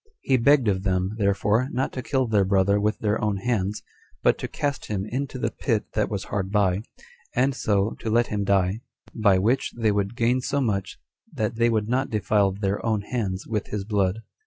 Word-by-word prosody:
He 135 - +2
begged 130 0 +4
of 95 -2 +1
them, 95 0 0
therefore, 105 +4 +2
not 130 0 -2
to 130 - -4
kill 130 0 0
their 105 -4 +2
brother 100 +1 +3
with 105 +1 +1
their 105 +1 -1
own 105 -2 +1
hands, 105 -1 -1 0.4
but - - +3
to - - -3
cast 145 -1 -3
him 100 -2 -2
into 130 +4 -4
the - - -1
pit 110 -5 -1
that 105 -1 0
was 100 -3 -3
hard 95 -1 -3
by, 100 -2 +2 0.5
and 130 +3 +2
so 105 -3 +1
to 115 - -4
let 120 +2 +3
him 105 -3 -2
die; 95 +1 +1 0.3
by 105 -4 +3
which 115 +8 +1
they 110 -2 +2
would 100 +2 -1
gain 125 +2 +2
so 140 +2 -1
much, 100 -7 -1 0.3
that 110 -6 -2
they 115 0 +3
would 110 -2 0
not 130 +3 0
defile 105 -2 +2
their 100 +1 -2
own 110 -3 +1
hands 100 -4 -3
with 105 -3 -3
his 105 -2 -3
blood. 100 0 0
105 Hz, 205 wpm, -25 LUFS, 100-120 Hz, 0.5 s, begged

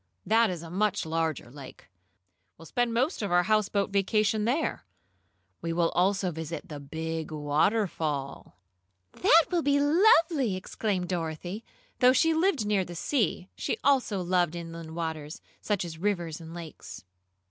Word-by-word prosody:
"That 225 0 +4
is 175 -3 -5
a 165 - -9
much 200 0 0
larger 160 -6 -2
lake. 135 -1 -12 0.7
We'll 165 - -13
spend 245 +7 0
most 255 +8 0
of 205 - -2
our 175 0 +4
houseboat 205 -1 +1
vacation 210 +2 +1
there. 280 +7 0 0.8
We 165 0 -2
will 165 0 +2
also 190 +1 +1
visit 160 0 -6
the 150 -2 -6
big 160 +2 -5
waterfall." 150 - -1 0.5
"That 330 +1 +5
will 350 -2 +2
be 285 -1 +2
lovely!" 315 - +4
exclaimed 185 -1 -2
Dorothy. 175 +4 -4 0.4
Though 255 0 +6
she 325 +4 +3
lived 320 - +1
near 205 -2 +2
the 175 -1 -9
sea, 195 - -1
she - - -2
also 250 -9 +2
loved 175 -2 +1
inland 165 -1 -7
waters, 160 -2 -4 0.2
such 205 -4 -1
as 160 -2 -8
rivers 175 -4 -2
and 165 0 -10
lakes. 165 - -9
180 Hz, 145 wpm, -28 LUFS, 160-220 Hz, 0.8 s, Though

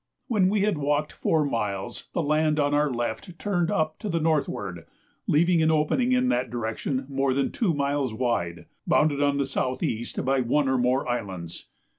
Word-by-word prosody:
When 205 -7 +3
we 205 0 +1
had 200 -6 +1
walked 145 +1 0
four 155 -2 +1
miles 105 -7 -3
the 170 - 0
land 155 +1 +2
on 145 0 +2
our 150 0 +3
left 120 +7 -4
turned 175 -4 0
up 155 0 0
to 215 - -4
the 170 -2 0
northward, 120 - -1 0.4
leaving 170 +2 +3
an 160 - +3
opening 160 +12 +2
in 255 0 +3
that 125 0 0
direction 120 +3 -3
more 135 -1 0
than 140 - 0
two 215 -7 +1
miles 140 -2 0
wide, 85 -9 -2 0.2
bounded 150 -2 +3
on 145 -1 +2
the 140 - +1
south 130 -1 -2
east 115 +1 -2
by 135 0 +2
one 135 +4 +1
or 130 -1 +2
more 125 +2 +1
islands. 95 -8 -5
140 Hz, 185 wpm, -26 LUFS, 120-160 Hz, 0.4 s, When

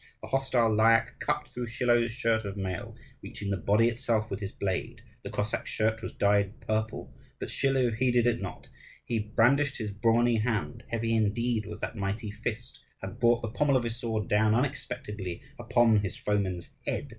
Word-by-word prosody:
The - - -7
hostile 130 -4 +2
Lyakh 115 +1 +4
cut 150 0 -1
through 120 -1 -5
Schilo's 120 -1 +2
shirt 115 -2 0
of 100 -1 -5
mail, 95 -3 -4 0.3
reaching 100 -1 -5
the - - +2
body 105 +6 +3
itself 115 -2 0
with 100 - -3
his 100 -2 -4
blade. 110 +4 -3 0.2
The - - -7
Cossack's 105 +1 -2
shirt 110 +1 0
was - - -5
dyed 100 +3 +1
purple: 110 -1 -3 0.3
but - - -4
Schilo 135 -3 +2
heeded 125 0 +3
it 120 - +2
not. - - -7 0.4
He 115 -2 0
brandished 125 +7 +2
his 110 -3 -3
brawny 115 +3 +3
hand, 115 +1 -1
heavy 115 0 -1
indeed 110 0 +1
was 105 0 -8
that - - -3
mighty 105 +1 -3
fist, 120 +5 -5 0.2
and 95 -1 -6
brought 120 0 +3
the 115 - -2
pommel 140 +3 +2
of 125 - -1
his 115 0 -3
sword 110 -4 -2
down 110 +1 +3
unexpectedly 105 - -3 0.2
upon 115 -2 +4
his 100 -3 -2
foeman's 95 -4 -1 0.2
head. - - -2
115 Hz, 180 wpm, -29 LUFS, 105-120 Hz, 0.4 s, Lyakh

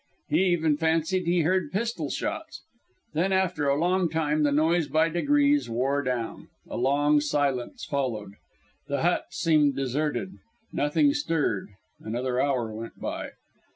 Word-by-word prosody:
He - - +3
even 160 -4 +2
fancied 165 +3 +1
he 175 0 +3
heard 185 +3 +1
pistol 230 +4 -2
shots. - - -4 0.5
Then 175 +5 +1
after 185 -6 +1
a 140 +1 +2
long 180 +1 +2
time 155 -1 0
the 145 -1 +3
noise 160 +2 +2
by 155 +3 +2
degrees 290 - +2
wore 135 +5 0
down; 125 -4 -3 0.2
a - - -6
long 145 +3 +3
silence 145 -4 -1
followed. 115 -8 -3 0.5
The 140 -1 -1
hut 175 +1 +2
seemed 155 -5 +2
deserted; 145 +7 -1 0.4
nothing 285 - +2
stirred; 165 - -1 0.3
another 125 +3 -1
hour 125 -6 0
went 115 +1 -8
by. - - -5
150 Hz, 140 wpm, -26 LUFS, 135-175 Hz, 0.5 s, He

